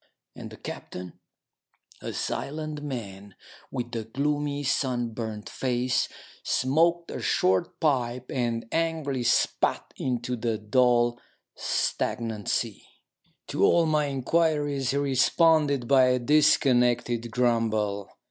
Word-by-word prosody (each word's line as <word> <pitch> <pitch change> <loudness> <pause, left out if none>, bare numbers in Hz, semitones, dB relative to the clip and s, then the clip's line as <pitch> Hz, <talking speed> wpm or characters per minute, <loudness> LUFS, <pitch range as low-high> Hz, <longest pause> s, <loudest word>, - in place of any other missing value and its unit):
And - - -8
the - - -12
captain, 90 -2 -8 0.8
a - - -4
silent 155 0 -4
man 100 -8 -7 0.3
with 120 -1 -5
a 115 - -2
gloomy, 145 +4 -2
sunburnt 120 -5 -2
face, 125 -1 0 0.3
smoked 170 +6 +1
a - - -5
short 95 0 +1
pipe 125 -4 0
and 120 -3 -1
angrily 160 -5 -1
spat 120 - +1
into 125 -1 -2
the 115 -1 -1
dull, 120 +2 +2 0.3
stagnant 110 -3 -2
sea. - - -1 0.7
To - - 0
all 170 -1 +5
my 155 -1 +2
inquiries 145 -1 0
he 140 - 0
responded 140 0 +3
by 130 -1 +6
a 125 0 +3
dis 150 +5 +4
connected 120 -2 +1
grumble. 110 -4 0
125 Hz, 110 wpm, -26 LUFS, 115-145 Hz, 0.8 s, by